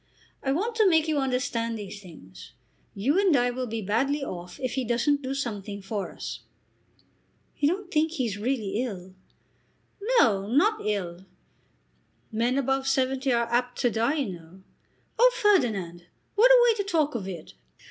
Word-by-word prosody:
I 270 Hz, -, -1 dB
want 410 Hz, -, -1 dB
to 430 Hz, -4 st, +5 dB
make 320 Hz, -2 st, +3 dB
you 305 Hz, -2 st, +1 dB
understand 250 Hz, -3 st, -1 dB
these 205 Hz, -1 st, -8 dB
things. 125 Hz, -, -13 dB, 0.4 s
You 270 Hz, -, +1 dB
and 375 Hz, -7 st, +4 dB
I 245 Hz, 0 st, +2 dB
will 250 Hz, +1 st, -4 dB
be 225 Hz, -1 st, -4 dB
badly 270 Hz, +9 st, 0 dB
off 175 Hz, -7 st, -7 dB
if 255 Hz, -3 st, -2 dB
he 265 Hz, -, -1 dB
doesn't 245 Hz, +5 st, +1 dB
do 265 Hz, 0 st, -3 dB
something 205 Hz, -6 st, -4 dB
for 200 Hz, 0 st, -4 dB
us." -, -, -6 dB, 1.2 s
"You 290 Hz, -, +3 dB
don't 370 Hz, +3 st, -2 dB
think 315 Hz, +1 st, +1 dB
he 265 Hz, -6 st, -1 dB
is 205 Hz, -3 st, -4 dB
really 220 Hz, -3 st, -1 dB
ill?" 190 Hz, -7 st, -6 dB, 1.0 s
"No; 200 Hz, -, +3 dB
not 405 Hz, -, +2 dB
ill. 185 Hz, -3 st, -3 dB, 1.0 s
Men 235 Hz, +4 st, 0 dB
above 270 Hz, 0 st, 0 dB
seventy 265 Hz, 0 st, +1 dB
are 235 Hz, -1 st, +2 dB
apt 245 Hz, +1 st, 0 dB
to 245 Hz, -3 st, +2 dB
die, 230 Hz, +7 st, +1 dB
you 270 Hz, -11 st, -2 dB
know." 170 Hz, +4 st, -17 dB, 0.6 s
"Oh, -, -, +7 dB
Ferdinand, 215 Hz, -, +1 dB, 0.3 s
what 460 Hz, +4 st, +5 dB
a -, -, +8 dB
way 465 Hz, -, +5 dB
to 405 Hz, -, 0 dB
talk 320 Hz, -6 st, 0 dB
of 210 Hz, -6 st, -4 dB
it!" 175 Hz, -5 st, -8 dB
245 Hz, 170 wpm, -26 LUFS, 205-290 Hz, 1.2 s, a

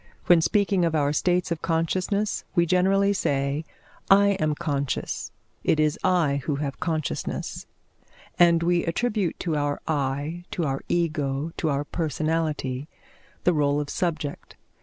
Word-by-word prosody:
When 175 Hz, -2 st, +6 dB
speaking 195 Hz, 0 st, +2 dB
of 165 Hz, -1 st, +1 dB
our 145 Hz, -1 st, +2 dB
states 180 Hz, +2 st, +1 dB
of 165 Hz, -, -2 dB
consciousness, 185 Hz, +5 st, 0 dB
we 170 Hz, -2 st, +4 dB
generally 195 Hz, +3 st, +3 dB
say, 140 Hz, -3 st, -1 dB, 0.4 s
"I 200 Hz, +1 st, +6 dB
am 155 Hz, -2 st, +1 dB
conscious; 140 Hz, -4 st, -2 dB, 0.3 s
it 155 Hz, -, +2 dB
is 155 Hz, 0 st, +2 dB
I 155 Hz, -6 st, +2 dB
who 150 Hz, -, 0 dB
have 140 Hz, -1 st, -4 dB
consciousness," 160 Hz, -3 st, -3 dB, 0.7 s
and 170 Hz, -1 st, +5 dB
we 175 Hz, 0 st, +2 dB
attribute 200 Hz, 0 st, -1 dB
to 165 Hz, -3 st, -1 dB
our 145 Hz, -1 st, -1 dB
I, 145 Hz, +3 st, -2 dB
to 170 Hz, -, -2 dB
our 135 Hz, -1 st, -2 dB
Ego, 155 Hz, -3 st, 0 dB
to 160 Hz, -, 0 dB
our 140 Hz, 0 st, 0 dB
personality, 155 Hz, -3 st, -2 dB, 0.6 s
the 180 Hz, -, +4 dB
rôle 145 Hz, -2 st, +2 dB
of 145 Hz, -1 st, -4 dB
subject. 155 Hz, -5 st, -3 dB
160 Hz, 140 wpm, -25 LUFS, 145-175 Hz, 0.7 s, When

